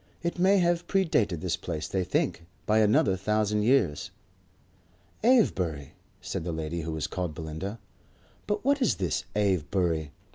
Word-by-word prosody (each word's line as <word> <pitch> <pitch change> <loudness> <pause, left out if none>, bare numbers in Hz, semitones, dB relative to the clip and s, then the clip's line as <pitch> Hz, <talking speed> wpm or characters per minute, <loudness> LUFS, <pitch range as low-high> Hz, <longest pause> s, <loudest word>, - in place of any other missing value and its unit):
It 170 +1 -2
may 190 +2 +5
have 175 -1 +1
predated 140 - +1
this 90 -3 0
place, 80 -3 -5
they 95 -1 -1
think, 85 -1 -1 0.2
by 110 +1 +3
another 105 -3 +4
thousand 105 +2 0
years." 105 - +2 1.1
"Avebury?" 90 - +2 0.3
said - - -4
the 85 - -3
lady 80 +1 -3
who 80 +1 -4
was 80 -1 -2
called 90 -3 -3
Belinda. 80 +6 -5 0.7
"But 210 +2 -2
what 280 0 +2
is 250 - +3
this 95 +1 -2
Avebury?" 90 -5 0
95 Hz, 145 wpm, -28 LUFS, -, 1.1 s, may